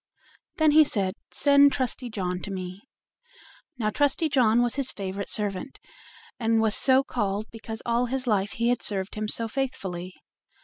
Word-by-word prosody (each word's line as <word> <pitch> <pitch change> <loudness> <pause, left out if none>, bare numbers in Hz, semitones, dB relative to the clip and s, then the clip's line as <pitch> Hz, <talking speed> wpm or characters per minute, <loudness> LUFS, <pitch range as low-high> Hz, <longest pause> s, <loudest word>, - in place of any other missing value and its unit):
Then 315 -1 +4
he 310 +1 +7
said, 195 -9 -1 0.2
"Send 280 0 +4
Trusty 255 -1 -2
John 180 -4 -3
to - - -6
me." 185 0 -6 1.0
Now 215 -3 -1
Trusty 290 +5 +1
John 240 -4 +3
was 240 - 0
his 275 -2 0
favorite 195 0 -5
servant, 210 +5 -1 0.6
and 225 -1 +2
was 220 -1 +2
so 265 0 +5
called 210 -5 -2
because 225 0 -7
all 235 +1 +1
his 260 +1 -2
life 205 -4 0
he 235 +1 0
had 245 -1 0
served 195 -2 -2
him 215 0 -3
so 230 +2 -1
faithfully. 190 -8 -4
225 Hz, 165 wpm, -26 LUFS, 200-260 Hz, 1.0 s, he